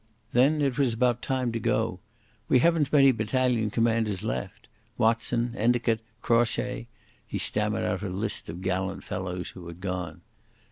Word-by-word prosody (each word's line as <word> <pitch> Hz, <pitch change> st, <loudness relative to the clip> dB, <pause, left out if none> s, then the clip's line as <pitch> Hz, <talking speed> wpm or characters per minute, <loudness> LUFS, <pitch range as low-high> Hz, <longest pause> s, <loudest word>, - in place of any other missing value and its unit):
Then 145 Hz, +5 st, +4 dB
it 135 Hz, 0 st, 0 dB
was 125 Hz, -5 st, +2 dB
about 120 Hz, 0 st, +2 dB
time 130 Hz, -2 st, -1 dB
to 115 Hz, -, -2 dB
go.... 110 Hz, -3 st, 0 dB, 0.5 s
We -, -, +6 dB
haven't 160 Hz, +1 st, +3 dB
many 135 Hz, -2 st, +6 dB
battalion 115 Hz, 0 st, +1 dB
commanders 110 Hz, -3 st, +1 dB
left. 105 Hz, -1 st, -4 dB, 0.3 s
Watson, 115 Hz, +1 st, +1 dB
Endicot, 120 Hz, 0 st, +2 dB, 0.2 s
Crawshay...." 120 Hz, +1 st, +1 dB, 0.4 s
He -, -, -3 dB
stammered -, -, 0 dB
out -, -, -1 dB
a 100 Hz, -, -3 dB
list 95 Hz, +1 st, -2 dB
of 85 Hz, +3 st, -7 dB
gallant 95 Hz, 0 st, -2 dB
fellows 90 Hz, -1 st, -4 dB
who 90 Hz, -2 st, -11 dB
had 85 Hz, +1 st, -9 dB
gone. 90 Hz, -3 st, -4 dB
115 Hz, 150 wpm, -27 LUFS, 95-125 Hz, 0.5 s, We